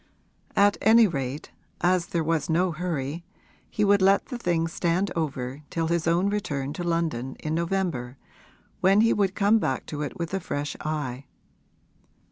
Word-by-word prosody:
At 205 0 +4
any 225 +2 +6
rate, 140 -5 -3 0.3
as 180 0 +2
there 170 -2 -1
was 165 0 0
no 175 +3 +2
hurry, 165 -2 -3 0.5
he 210 - 0
would 200 -1 +4
let 195 +1 +4
the 250 - -6
thing 170 -5 0
stand 175 +4 0
over 140 -4 -3
till 165 -1 -1
his 170 -1 0
own 175 +4 +3
return 145 -9 -2
to 175 - -5
London, 165 -7 -1
in 155 - -4
November, 165 -7 -2 0.6
when 195 +3 +5
he 230 - +4
would 195 -2 0
come 210 +2 +4
back 135 -10 -2
to 150 -1 -5
it 145 -4 -4
with 170 +1 -4
a 195 - 0
fresh 145 -4 -4
eye. 145 -4 -4
170 Hz, 165 wpm, -26 LUFS, 145-190 Hz, 0.6 s, any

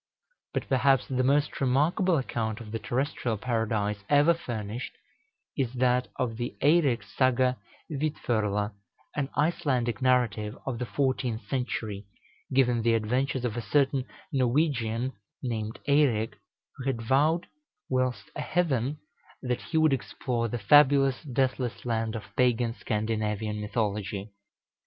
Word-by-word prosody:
But - - -1
perhaps 135 0 +3
the 130 -1 0
most 145 +3 +1
remarkable 155 +7 +3
account 115 -4 -2
of 110 -3 -9
the 115 - -2
terrestrial 125 -3 -1
Paradise 110 -3 -1
ever 145 +3 +5
furnished, 120 -7 -5 0.6
is 130 -3 -1
that 125 0 +2
of 120 -4 -2
the 120 0 -4
"Eireks 145 -6 +3
Saga 130 -1 +3 0.3
Vídförla," 110 -8 -1 0.4
an 145 -2 -1
Icelandic 135 -8 +1
narrative 120 -5 +1
of 125 -3 -3
the 125 - -3
fourteenth 130 -4 -1
century, 110 -6 -3 0.4
giving 125 -3 +3
the 115 0 +3
adventures 125 +4 0
of 115 -3 -2
a 120 - -2
certain 135 0 +1 0.3
Norwegian, 130 -2 +1 0.3
named 110 -3 -3
Eirek, 135 -7 +3 0.4
who 130 - -7
had 135 -4 0
vowed, 150 +8 +2 0.4
whilst 130 -6 -1
a - - -3
heathen, 145 -6 0 0.5
that 125 -1 -1
he 160 - -2
would 155 -2 +5
explore 120 -2 -2
the 120 - -3
fabulous 135 +3 +5
Deathless 125 -4 -1
Land 115 -1 -1
of 110 - -4
pagan 120 -2 +2
Scandinavian 105 -1 -2
mythology. 105 -1 -2
125 Hz, 130 wpm, -28 LUFS, 110-135 Hz, 0.6 s, ever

